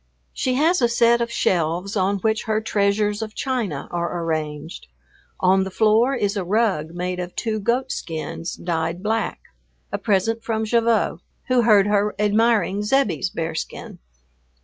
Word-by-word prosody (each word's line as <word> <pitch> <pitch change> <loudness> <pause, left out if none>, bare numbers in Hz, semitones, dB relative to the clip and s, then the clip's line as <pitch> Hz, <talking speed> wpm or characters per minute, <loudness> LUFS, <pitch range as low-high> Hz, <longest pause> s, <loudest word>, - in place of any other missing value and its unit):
She 255 -1 -1
has 325 +5 +3
a 240 - +5
set 235 0 +3
of 235 0 -2
shelves 175 +1 0
on 200 0 +1
which 220 +1 0
her 215 -1 +1
treasures 205 0 0
of 220 -1 -6
china 235 - -2
are 170 0 -2
arranged. 155 - -4 0.5
On 190 +1 +3
the 190 - -4
floor 220 +6 +3
is 205 -4 -1
a 200 - -1
rug 180 -5 0
made 180 +1 -3
of 180 0 -5
two 220 -2 -2
goatskins 195 -8 -3
dyed 170 +1 -3
black, 220 +1 -1 0.5
a - - -2
present 225 +2 0
from 220 -1 -1
Gavotte, 230 0 +1 0.3
who 255 -1 +4
heard 210 -4 +5
her 205 0 +1
admiring 210 -1 +2
Zebbie's 210 - +1
bearskin. 165 -2 -5
205 Hz, 150 wpm, -22 LUFS, 180-225 Hz, 0.5 s, a